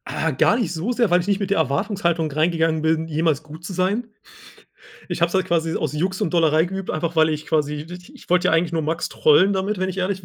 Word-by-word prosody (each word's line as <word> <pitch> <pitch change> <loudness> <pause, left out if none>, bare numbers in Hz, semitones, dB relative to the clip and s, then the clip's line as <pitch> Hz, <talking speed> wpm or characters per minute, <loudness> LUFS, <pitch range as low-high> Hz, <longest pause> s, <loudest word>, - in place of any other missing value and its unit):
Äh, 160 -1 0
gar 170 +11 +3
nicht 215 -9 -2
so 175 +8 -2
sehr, 235 -3 +1
weil 175 +1 +4
ich 180 - -4
nicht 200 -1 +1
mit 200 -1 -3
der 200 - +1
Erwartungshaltung 165 - 0
reingegangen 160 +1 +1
bin, 160 +1 0
jemals 160 -1 0
gut 155 +3 -11
zu 190 - -6
sein. 195 +6 -1 1.0
Ich - - -4
habe 170 - +4
es 170 - -10
halt 190 -1 +1
quasi 165 -2 0
aus 155 -4 -2
Jux 185 +5 -2
und 160 - -1
Dollerei 160 -2 +3
geübt, 190 +1 -5
einfach 165 +1 -3
weil 160 0 +5
ich 155 -1 -3
quasi, 150 -1 -1
di 180 +2 -11
ich - - -17
wollte 180 0 +3
ja - - +2
eigentlich 165 +1 +1
nur 165 - 0
Max 160 +3 -2
trollen 180 +6 +4
damit, 195 +1 -2
wenn 185 0 -1
ich 185 - -7
ehrlich 190 +1 -2
bin. - - -13
170 Hz, 260 wpm, -22 LUFS, 160-185 Hz, 1.0 s, weil